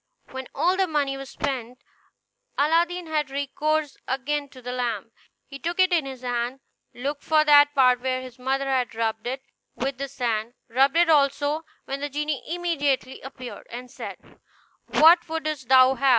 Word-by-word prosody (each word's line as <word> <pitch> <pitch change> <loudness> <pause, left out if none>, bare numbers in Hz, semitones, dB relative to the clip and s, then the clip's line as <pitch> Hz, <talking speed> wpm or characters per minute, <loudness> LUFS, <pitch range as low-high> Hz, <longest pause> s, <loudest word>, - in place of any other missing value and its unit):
When 260 -1 -6
all 365 +2 +2
the 380 -1 +2
money 290 -4 0
was 270 0 -8
spent, 250 -2 -4 0.7
Aladdin 340 +4 +2
had 305 -3 -1
recourse 290 +2 -1
again 280 +2 -2
to 265 - -14
the 250 0 -6
lamp. 230 -3 -3 0.3
He 275 0 -10
took 345 +4 -3
it 370 -1 +4
in 320 -5 +2
his 260 -2 -8
hand, 245 +1 -2 0.4
looked 280 +4 -4
for 310 -1 +3
that 290 0 +6
part 250 -2 +5
where 255 0 0
his 255 -1 -10
mother 270 +2 -1
had 255 -4 0
rubbed 225 0 -2
it 265 +2 -4 0.3
with 270 0 -3
the 275 - -2
sand, 240 -3 -2
rubbed 270 +5 +3
it 340 -1 +5
also, 290 +1 +2 0.2
when 275 +1 -4
the 290 +1 -3
genie 295 0 -2
immediately 290 -6 -1
appeared, 255 -2 -9
and 245 +1 -8
said, - - -7 0.7
"What 335 +2 +6
wouldst 310 -5 -3
thou 260 0 +7
have? 270 +1 +2
275 Hz, 170 wpm, -25 LUFS, 255-300 Hz, 0.7 s, thou